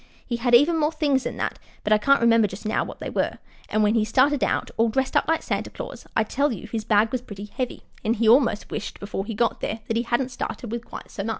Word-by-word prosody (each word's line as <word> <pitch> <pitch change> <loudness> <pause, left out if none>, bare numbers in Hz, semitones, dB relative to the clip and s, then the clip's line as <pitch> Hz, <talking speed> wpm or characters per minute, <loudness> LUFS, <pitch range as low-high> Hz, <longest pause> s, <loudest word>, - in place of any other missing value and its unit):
He 240 - -2
had 240 0 +4
even 315 +6 +5
more 300 0 +2
things 285 -5 +1
than - - -4
that, - - -3 0.2
but 210 - +3
I 210 - +4
can't 275 +5 +4
remember 230 -2 +5
just 195 +3 -9
now 215 - +1
what - - -8
they - - -6
were; - - -1 0.3
and 215 - +2
when 210 +1 +3
he 225 -2 +3
started 260 +5 +3
out, - - 0
all 230 0 +3
dressed 265 +3 -1
up - - +3
like 325 0 +1
Santa - - -2
Claus, - - -8
I 220 - +4
tell 280 +6 0
you 220 -2 -6
his 220 0 -4
bag 215 0 +3
was 255 - -1
pretty 205 -4 -8
heavy, 250 +4 -5 0.2
and 225 +2 +1
he 225 0 +1
almost 235 -2 +4
wished 205 - -5
before 200 -1 -4
he 225 - -4
got 235 +2 0
there 220 +1 -3
that 225 - 0
he - - +2
hadn't 245 +2 0
started 245 -2 -5
with 235 0 -3
quite - - -10
so 195 - -4
much. - - -2
230 Hz, 270 wpm, -24 LUFS, 215-260 Hz, 0.3 s, even